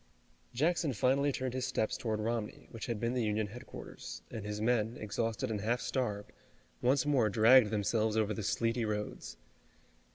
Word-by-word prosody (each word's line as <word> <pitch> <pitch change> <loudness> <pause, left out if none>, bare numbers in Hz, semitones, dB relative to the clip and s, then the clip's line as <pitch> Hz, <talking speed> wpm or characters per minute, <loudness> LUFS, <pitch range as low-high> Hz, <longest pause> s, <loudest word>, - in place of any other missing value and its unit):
Jackson 155 +3 +1
finally 135 +6 +2
turned 130 -2 -3
his 130 -1 -1
steps 110 +3 0
toward 115 -5 -2
Romney, 110 0 -3
which 115 - -6
had 115 -3 -2
been 115 +2 0
the 125 - 0
Union 105 0 0
headquarters, 115 +5 -9
and 110 -3 -5
his 105 0 -4
men, 115 0 +1
exhausted 115 +3 -2
and 105 -2 -2
half 120 +4 +1
starved, 105 -8 -2 0.5
once 130 +3 +3
more 135 -7 +3
dragged 115 +2 +6
themselves 110 +1 +1
over 110 -1 +2
the 110 - -4
sleety 115 +3 0
roads. 105 - -4
115 Hz, 165 wpm, -33 LUFS, 105-125 Hz, 0.5 s, dragged